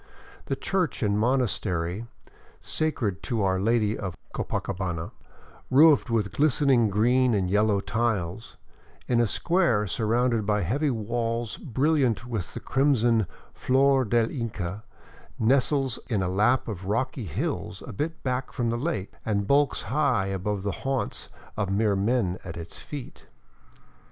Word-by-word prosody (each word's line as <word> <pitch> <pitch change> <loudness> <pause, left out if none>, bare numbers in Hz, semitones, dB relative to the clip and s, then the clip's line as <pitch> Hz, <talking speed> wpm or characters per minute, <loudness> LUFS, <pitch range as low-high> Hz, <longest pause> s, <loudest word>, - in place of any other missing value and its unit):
The - - -1
church 180 -8 -1
and 105 0 +1
monastery 110 -5 0 0.5
sacred 115 - -1
to 115 -5 -1
Our 95 -1 +1
Lady 110 +1 +2
of 95 -4 -5 0.2
Copacabana, 90 -3 -3 0.6
roofed 145 0 +6
with 110 -4 0
glistening 135 -4 +3
green 120 +4 +3
and 95 -2 0
yellow 105 0 +3
tiles, 105 -2 -2 0.5
in 120 -2 +2
a 120 - +3
square 165 - +2
surrounded 115 +2 +1
by 105 -1 +1
heavy 140 - 0
walls 115 0 -2
brilliant 135 -3 +1
with 110 -7 -4
the - - -3
crimson 120 -6 +2 0.4
^or 135 -2 +4
del 115 0 +2
Inca, 105 -5 -4 0.5
nestles 135 +2 +2
in 105 -6 0
a - - 0
lap 105 +7 +2
of 95 -4 -5
rocky 120 +4 -1
hills 100 - -3
a 125 - -8
bit 155 +10 -4
back 130 0 -2
from 120 -2 -1
the 120 - -2
lake 140 - -3
and 100 -2 0
bulks 140 +4 +2
high 130 -4 +1
above 95 +1 -2
the 100 - -1
haunts 135 -1 -2 0.3
of 100 -3 -1
mere 100 +1 +2
men 100 -3 0
at 85 -3 -7
its 85 0 -8
feet. 145 -4 -9
115 Hz, 140 wpm, -26 LUFS, 100-130 Hz, 0.6 s, roofed